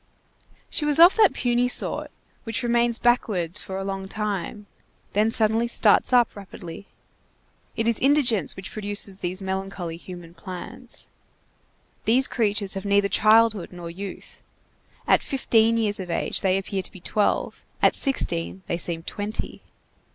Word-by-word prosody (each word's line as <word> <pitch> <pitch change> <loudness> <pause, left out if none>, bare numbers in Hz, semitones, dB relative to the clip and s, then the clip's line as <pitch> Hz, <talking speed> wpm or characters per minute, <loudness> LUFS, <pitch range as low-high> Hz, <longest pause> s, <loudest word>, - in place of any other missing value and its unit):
She - - -1
was 295 -1 +3
of 345 +3 +9
that 430 -4 +6
puny 245 0 +1
sort 250 - 0 0.3
which 225 +2 -1
remains 235 -1 +2
backward 205 -9 +1
for 190 - -6
a 195 - -3
long 195 0 -4
time, 210 0 -4 0.5
then 210 +2 +3
suddenly 225 +1 +2
starts 225 -1 +3
up 245 -2 +4
rapidly. 195 -1 -10 0.9
It 225 - -1
is 235 -2 +1
indigence 250 - +2
which 190 0 -8
produces 205 -2 -4
these 185 +2 -3
melancholy 190 -3 -4
human 175 -1 -11
plants. 185 +8 -8 1.0
These 255 +4 +4
creatures 205 -4 0
have 195 -1 -5
neither 200 0 +2
childhood 215 -1 +4
nor 175 -2 -8
youth. 195 +2 -9 0.7
At - - +5
fifteen 230 -4 +2
years 210 -3 0
of 185 -2 -6
age - - 0
they 190 -1 +2
appear 195 0 -3
to 185 - -6
be 185 - -12
twelve, 205 +4 -1 0.2
at - - +4
sixteen 190 - -1
they 170 - -2
seem 165 -1 -4
twenty. 205 +4 -5
205 Hz, 145 wpm, -24 LUFS, 190-230 Hz, 1.0 s, of